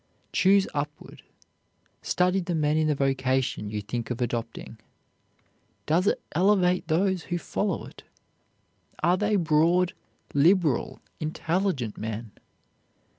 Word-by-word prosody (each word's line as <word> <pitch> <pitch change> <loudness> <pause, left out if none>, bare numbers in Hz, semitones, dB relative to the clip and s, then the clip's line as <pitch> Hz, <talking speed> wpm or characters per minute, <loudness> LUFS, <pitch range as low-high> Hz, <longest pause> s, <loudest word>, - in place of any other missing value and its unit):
Choose 195 +1 +4
upward, 145 0 -5 0.8
study 180 +1 +1
the 175 -1 -2
men 150 -1 +1
in 155 0 +2
the 150 - +2
vocation 130 -5 0
you 105 0 -3
think 120 +2 -4
of 120 -1 -3
adopting. 115 -2 -4 1.1
Does 170 +6 +2
it - - +2
elevate 180 0 +2
those 180 +2 +1
who 175 - -2
follow 195 +2 -2
it? - - -13 1.0
Are 175 +2 +4
they 210 +2 +1
broad, 170 +1 +3 0.4
liberal, 155 -1 +2 0.2
intelligent 160 - -2
men? 110 0 -5
160 Hz, 115 wpm, -26 LUFS, 130-180 Hz, 1.1 s, Choose